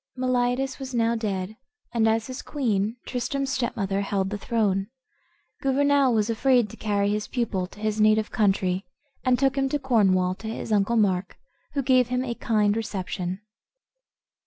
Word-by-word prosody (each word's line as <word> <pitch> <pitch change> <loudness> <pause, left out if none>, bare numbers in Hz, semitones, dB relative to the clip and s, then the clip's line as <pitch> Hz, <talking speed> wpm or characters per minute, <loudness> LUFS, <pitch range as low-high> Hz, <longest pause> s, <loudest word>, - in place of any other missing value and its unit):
Meliadus 255 +1 0
was 260 -2 -6
now 230 0 +2
dead, 205 -3 -3 0.4
and 225 -2 +3
as 225 0 +1
his 255 +2 -6
queen, 225 -5 -1
Tristram's 270 +2 -2
stepmother, 200 -7 -1
held 195 -1 -1
the 210 - -2
throne, 200 -4 0 0.7
Gouvernail 280 0 +3
was 215 -2 +2
afraid 240 -1 +2
to - - -10
carry 205 -1 0
his 210 0 -2
pupil 205 -7 -1
to 205 - -16
his 215 0 -1
native 215 0 +3
country, 190 -3 +1 0.4
and 255 -1 +3
took 270 0 +2
him 270 -1 +1
to 295 - 0
Cornwall, 195 -9 +2
to 220 - -7
his 220 0 -5
uncle 210 +3 +2
Mark, 190 -3 +1 0.4
who 275 - +1
gave 255 -2 +4
him 250 +1 -1
a 240 - -2
kind 215 -3 +1
reception. 190 -3 -3
220 Hz, 160 wpm, -25 LUFS, 200-255 Hz, 0.7 s, gave